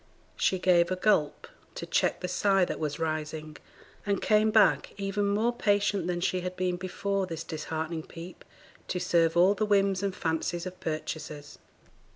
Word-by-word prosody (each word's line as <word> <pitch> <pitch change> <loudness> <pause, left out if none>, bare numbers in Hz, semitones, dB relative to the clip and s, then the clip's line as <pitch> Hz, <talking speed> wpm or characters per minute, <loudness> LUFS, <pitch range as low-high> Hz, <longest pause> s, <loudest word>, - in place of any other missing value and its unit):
She 190 - +1
gave 175 -2 +3
a 185 - 0
gulp 185 -6 +1 0.3
to - - -5
check - - +1
the 180 - -2
sigh 195 +1 +2
that - - -5
was 150 -2 -2
rising, 155 -1 -4 0.5
and 200 -2 0
came 215 0 +3
back, 215 -2 +3
even 200 0 -1
more 215 +4 +1
patient 205 -5 +1
than 175 -1 -2
she 185 0 0
had 180 0 -4
been 180 -1 -1
before 190 +1 -2
this 165 -2 -5
disheartening 160 0 -4
peep, 170 +2 -10 0.4
to 180 - -2
serve 170 -2 +2
all 185 +3 +6
the 205 +1 -2
whims 200 -2 +2
and 195 -2 -2
fancies 165 +2 -2
of 185 0 -7
purchasers. 155 -2 -5
180 Hz, 170 wpm, -28 LUFS, 165-200 Hz, 0.5 s, all